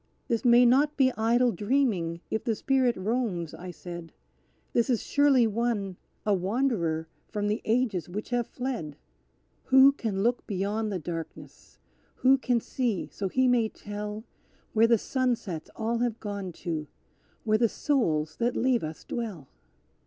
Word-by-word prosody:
This 230 -3 0
may 245 0 +6
not 285 +5 +3
be 260 -2 +4
idle 235 +2 +3
dreaming; 205 -6 0
if 220 - -1
the 225 - 0
spirit 260 0 +1
roams," 195 -5 -2
I 180 +1 -8
said, 175 -1 -8 0.6
"This 235 +2 +2
is 240 -4 +1
surely 285 -4 +4
one, 220 -3 -1 0.3
a 210 - +3
wanderer 185 -5 0 0.2
from 205 -1 -2
the 210 +3 -1
ages 220 -7 0
which 210 +6 -6
have 240 -1 0
fled! 240 - -4 0.7
Who 265 +1 +7
can 215 -8 -2
look 240 +2 0
beyond 210 +2 -1
the 195 - -1
darkness; 165 -1 -8 0.4
who 265 +1 +4
can 245 -2 +1
see 230 -4 -2
so 200 - -3
he 260 +5 +2
may 240 -3 +3
tell 210 +1 -6 0.5
Where 225 +1 +5
the 230 0 +5
sunsets 235 - -2
all 230 +1 -1
have 240 -2 -1
gone 200 -3 -5
to; 155 -3 -2 0.6
where 215 -1 +2
the 230 -1 +3
souls 155 - 0
that 240 +1 0
leave 250 -1 +2
us 155 0 -6
dwell? 200 - -5
225 Hz, 150 wpm, -28 LUFS, 185-245 Hz, 0.7 s, Who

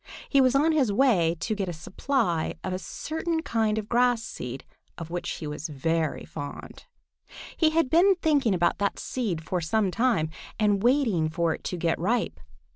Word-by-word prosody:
He 275 - +4
was 255 0 +3
on 300 +4 +4
his 275 -9 +2
way 200 -8 +3
to 220 - -1
get 200 -3 -2
a - - -3
supply 180 - -1
of 185 - -3
a 185 - -2
certain 320 - -3
kind 220 -5 0
of 215 -1 -3
grass 240 0 +2
seed 125 - -7 0.3
of 165 -1 -7
which 175 0 -3
he 160 - -7
is 150 +2 -5
very 160 +2 -1
fond. 145 0 -8 0.7
He 320 - +3
had 325 -2 +2
been 355 +8 +5
thinking 285 - +2
about 175 -1 +1
that 200 -1 0
seed 200 -11 -3
for 180 +2 -2
some 195 +4 +1
time 225 -9 +1 0.3
and 205 -2 +2
waiting 230 - +2
for 165 0 0
it - - -9
to 180 - -3
get 165 -1 0
ripe. 230 +8 0
210 Hz, 185 wpm, -26 LUFS, 165-255 Hz, 0.7 s, been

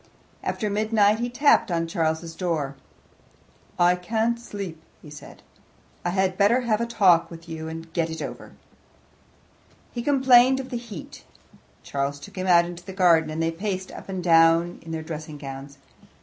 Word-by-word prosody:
After 215 - -2
midnight 210 0 +2
he 240 +1 -1
tapped 245 -3 +3
on 165 -1 0
Charles's 165 0 -2
door. 160 -6 -2 1.0
"I 175 0 +4
can't 225 +6 -1
sleep," 195 -8 -7 0.2
he 150 - -14
said. 150 - -12 0.6
"I 175 - 0
had 185 +1 0
better 220 +6 +4
have 230 -2 0
a 235 - -1
talk 195 -8 +4
with 165 0 -12
you 160 -1 -6
and 165 0 -8
get 165 -2 0
it 160 0 -6
over." - - -7 1.4
He 240 - -4
complained 265 -1 +5
of 265 0 -7
the 245 - -2
heat. 230 -8 -10 0.6
Charles 140 0 -3
took 200 +8 -12
him 185 0 -3
out 170 -1 +6
into 175 0 -8
the 190 +1 -9
garden, 170 -4 +4
and 160 +1 -2
they 165 - +1
paced 185 +2 -4
up - - -11
and 190 -2 -4
down 165 0 +4
in 165 - -9
their 160 -1 -4
dressing 155 -2 -7
gowns. 140 0 -9
175 Hz, 170 wpm, -24 LUFS, 165-215 Hz, 1.4 s, out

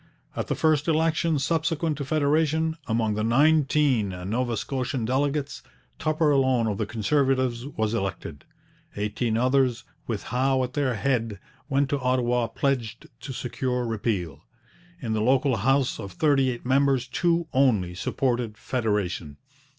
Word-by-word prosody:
At - - -3
the - - -1
first 155 -1 +2
election 160 0 +2
subsequent 160 +2 0
to 140 - -3
federation, 155 +2 +1
among 110 -1 +1
the 105 +1 -2
nineteen 140 -2 +3 0.2
Nova 120 0 -1
Scotian 130 -2 -2
delegates, 140 +3 -1 0.4
Tupper 155 0 +1
alone 130 -4 +3
of 105 -3 -2
the 110 - -1
Conservatives 130 +1 0
was 110 -6 -2
elected. 95 - -4 0.5
Eighteen 110 +2 -1
others, 130 0 +2 0.2
with 110 -4 -3
Howe 130 +2 +1
at 125 0 -4
their 135 -4 0
head, 115 -2 -1 0.3
went 140 0 +2
to 145 - +1
Ottawa 125 -2 +1
pledged 120 -5 -2
to 135 +3 -7
secure 125 0 -2
repeal. 100 - -2 0.6
In 115 -4 -2
the 110 - 0
local 130 +1 +2
house, 135 +5 +1
of 100 -4 -7
thirty 135 - +2
eight 120 -1 -5
members 135 -1 +2
two 170 -1 0
only 110 -10 +2
supported 120 +3 -1
federation. 105 - -2
130 Hz, 140 wpm, -25 LUFS, 115-140 Hz, 0.6 s, nineteen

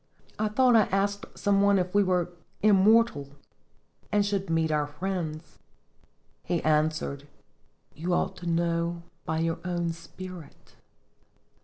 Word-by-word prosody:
I 215 - +1
thought 245 +3 +4
I 220 -3 +6
asked 200 +1 -1
some 200 -1 +2
one 200 0 +4
if 180 -1 -1
we 205 - +5
were 180 -2 +1 0.3
immortal 205 -7 +4 0.8
and 205 -1 +3
should 200 -2 -2
meet 165 -1 +1
our 150 -1 +1
friends. 160 -1 -5 0.8
He 175 -1 -1
answered, 155 -2 0 0.7
'You 170 +5 -4
ought - - -1
to 175 - -7
know 170 0 0 0.2
by 160 0 -1
your 165 0 -1
own 175 -1 -1
spirit.' 170 0 -11
175 Hz, 130 wpm, -27 LUFS, 160-200 Hz, 0.8 s, I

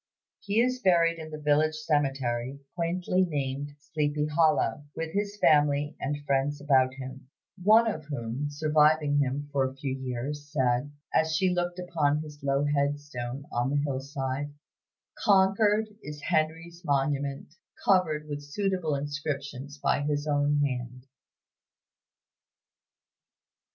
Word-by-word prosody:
He 205 +2 0
is 255 +1 +2
buried 170 -6 +3
in 160 -1 -7
the 155 - -6
village 150 +1 +2
cemetery, 135 -4 -1
quaintly 180 +2 0
named 145 -3 -3
"Sleepy 150 0 -1
Hollow," 150 -4 +2
with 160 0 -4
his 205 +1 -2
family 145 -3 +3
and 145 0 -3
friends 140 +1 +1
about 130 -3 +3
him; 130 0 -9 0.3
one 220 +4 +7
of 160 -9 -3
whom, 140 -1 -3
surviving 150 0 +3
him 140 +1 -1
for 140 -1 +2
a 130 0 -3
few 135 -1 -3
years, 135 +3 -5
said, 130 -1 +1 0.2
as 160 0 +2
she 185 +2 +2
looked 175 0 -1
upon 155 -4 0
his 150 -1 -11
low 140 +1 +1
head 145 0 +1
stone 135 -1 -6
on 120 +2 0
the 145 0 +1
hillside, 135 0 -3 0.7
"Concord 205 +2 +3
is 150 0 -8
Henry's 165 +2 -1
monument, 140 -1 -1 0.3
covered 155 -6 +2
with 145 -1 -4
suitable 165 +1 -1
inscriptions 145 -1 -4
by 145 - +1
his 145 0 -1
own 145 0 +2
hand." 125 -1 -4
145 Hz, 130 wpm, -28 LUFS, 140-160 Hz, 0.7 s, one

